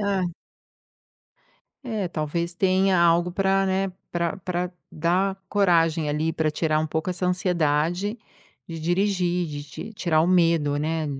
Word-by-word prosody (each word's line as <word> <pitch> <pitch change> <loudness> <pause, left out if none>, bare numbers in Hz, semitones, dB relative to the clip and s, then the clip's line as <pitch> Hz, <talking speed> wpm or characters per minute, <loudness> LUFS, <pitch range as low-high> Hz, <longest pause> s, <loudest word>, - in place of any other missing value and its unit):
Ah. 195 -3 0 1.5
É, 220 -7 -3
talvez, 170 +2 -3
tenha 190 0 +2
algo 170 +1 +3
pra 195 +1 +1
né, 190 0 0 0.2
pra 170 -2 -1
pra 180 -1 -3 0.2
dar 185 +5 0
coragem 165 -6 +2
ali, 155 +2 0
pra 155 -1 0
tirar 155 0 0
um 155 - 0
pouco 160 +3 -2
essa 180 0 -2
ansiedade 180 +2 0 0.5
de 165 -1 -6
dirigir, 180 0 +1
de 145 -2 -6
ti 150 +9 -9
tirar 170 -6 +1
o - - +2
medo, 165 -5 +3
né, 160 +1 -1
175 Hz, 140 wpm, -24 LUFS, 160-190 Hz, 1.5 s, algo